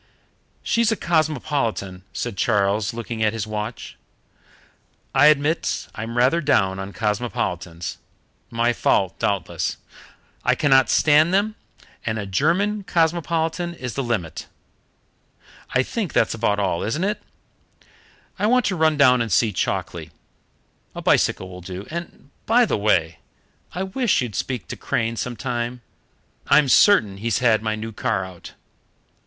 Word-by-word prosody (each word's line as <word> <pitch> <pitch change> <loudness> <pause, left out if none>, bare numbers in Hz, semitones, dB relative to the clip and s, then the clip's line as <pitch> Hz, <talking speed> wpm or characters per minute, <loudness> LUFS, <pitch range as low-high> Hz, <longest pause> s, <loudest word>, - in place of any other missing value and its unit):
"She's 230 -1 +2
a - - +2
cosmopolitan," 145 - -1
said 120 -4 -4
Charles, 100 0 +1
looking 115 -1 -5
at 110 0 +2
his 110 -1 -3
watch. 110 +2 -6 1.2
"I 140 +2 +6
admit 155 +2 +1
I'm 115 +2 -5
rather 130 +8 +3
down 95 - +2
on 95 +1 -6
cosmopolitans. 100 -6 -3 0.5
My 115 +1 +1
fault, 95 -4 +1
doubtless. 100 -2 -1 0.7
I - - +3
cannot 135 -3 +4
stand 155 +4 +4
them, 210 +2 +1 0.5
and 110 -1 -2
a 100 - -4
German 175 - +1
cosmopolitan 170 0 0
is 125 -7 -6
the 135 - -2
limit. 90 - -3 1.2
I 130 - +2
think 205 - -4
that's - - +2
about 105 -2 0
all, 95 -4 0
isn't 135 - -2
it? 210 +1 -1 1.2
I 210 - +2
want 250 0 +3
to 190 - 0
run 160 -2 +2
down 125 -4 +5
and 115 -2 -2
see 105 +4 +3
Chalkeley. - - -3 0.9
A - - -6
bicycle 95 - +2
will 90 0 -10
do. 95 +2 -7
And, 170 -4 -8 0.2
by 240 +2 +5
the - - 0
way, 85 -6 +1 0.5
I 185 - -2
wish 210 +4 +1
you'd 120 -4 -5
speak 125 -2 -3
to - - -4
Crane 115 +1 -2
some 120 +1 -4
time. 120 -1 -3 0.7
I'm 145 -2 +5
certain 110 - +5
he's 115 +2 -1
had 115 -4 +3
my 110 -1 -1
new 110 +1 -6
car 100 -3 -1
out." 90 -2 -12
120 Hz, 140 wpm, -22 LUFS, 105-160 Hz, 1.2 s, I